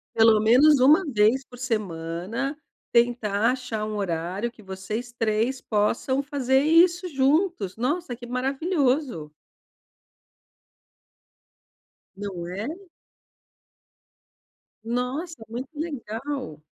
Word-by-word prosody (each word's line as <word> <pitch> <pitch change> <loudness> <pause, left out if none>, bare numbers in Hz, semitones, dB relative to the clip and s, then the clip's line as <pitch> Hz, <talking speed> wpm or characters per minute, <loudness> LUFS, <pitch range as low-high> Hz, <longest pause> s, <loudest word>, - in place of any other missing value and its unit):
Pelo 225 -1 +6
menos 255 +6 +6
1 305 +8 +6
vez 235 +1 +2
por 245 - -14
semana, 215 - -3 0.4
tentar 235 -2 +2
achar 245 -5 -4
um 215 - -4
horário 185 +4 -2
que 230 - -19
vocês 205 +5 -5
3 225 +3 0
possam 225 +5 0
fazer 270 -2 +1
isso 345 +3 +4
juntos, 280 - +1
nossa, 260 +2 -2
que 240 0 -10
maravilhoso. 265 - -1 2.8
Não 190 -4 -5
é. 200 +6 -4 2.2
Nossa, 250 +4 -3
muito 250 +5 -6
legal. 260 - -5
245 Hz, 90 wpm, -25 LUFS, 210-275 Hz, 2.8 s, Pelo